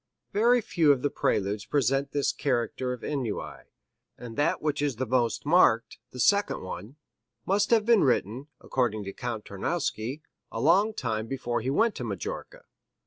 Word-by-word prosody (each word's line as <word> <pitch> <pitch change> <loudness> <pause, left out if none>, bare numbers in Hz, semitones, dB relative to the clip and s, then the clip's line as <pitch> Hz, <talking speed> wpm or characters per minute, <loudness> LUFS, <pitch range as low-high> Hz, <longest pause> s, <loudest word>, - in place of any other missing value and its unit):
Very 235 +4 +4
few 170 -8 +3
of 135 -3 +1
the 145 - +1
Preludes 100 +1 0
present 135 0 +1
this 145 -1 +1
character 125 -1 -1
of 125 -2 -6
ennui, 130 -8 -4 0.5
and 115 -2 -9
that 145 +5 +1
which 150 -2 -1
is 145 -3 0
the 130 +4 -2
most 120 0 0
marked, 145 -11 +3
the 125 - -10
second 200 +9 +2
one, 95 +7 -7 0.5
must 200 +2 +2
have 225 -3 +4
been 230 -3 +5
written, 125 0 0
according 110 -5 -1
to 100 0 -6
Count 120 -4 -5
Tarnowski, 130 - -3 0.3
a - - -4
long 190 - +3
time 110 -3 -2
before 120 -2 -2
he 125 - -2
went 220 +11 +2
to - - -4
Majorca. 100 -6 -6
130 Hz, 165 wpm, -27 LUFS, 115-155 Hz, 0.5 s, been